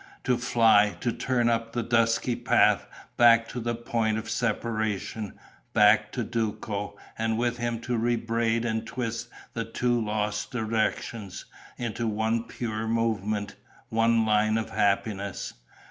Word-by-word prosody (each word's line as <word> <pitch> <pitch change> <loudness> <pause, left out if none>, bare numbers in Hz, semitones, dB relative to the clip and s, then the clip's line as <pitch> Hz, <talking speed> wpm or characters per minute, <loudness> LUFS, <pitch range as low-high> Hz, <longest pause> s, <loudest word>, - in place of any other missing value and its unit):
To 125 - +2
fly, 115 -4 +4
to 120 - +1
turn 120 0 0
up 115 -1 0
the 120 - -1
dusky 115 +1 +2
path, - - +3 0.3
back 115 -1 +6
to 125 - -5
the 120 0 -2
point 115 -2 0
of 110 +1 -5
separation, 110 -3 -2 0.4
back 105 0 +5
to 125 - -1
Duco, 105 -3 -3 0.2
and 110 0 0
with 120 0 0
him 120 -1 -1
to 125 +1 -2
rebraid 115 0 0
and 110 -1 -2
twist 115 -1 -3 0.3
the 115 - -2
two 120 +1 0
lost 105 -1 -2
directions 110 -3 -2 0.3
into 115 -1 -2
one 110 +2 0
pure 110 -2 -4
movement, 110 -2 -1 0.3
one 115 0 +3
line 110 0 +3
of 110 - -3
happiness!... 100 -1 -1
115 Hz, 135 wpm, -27 LUFS, 110-115 Hz, 0.4 s, back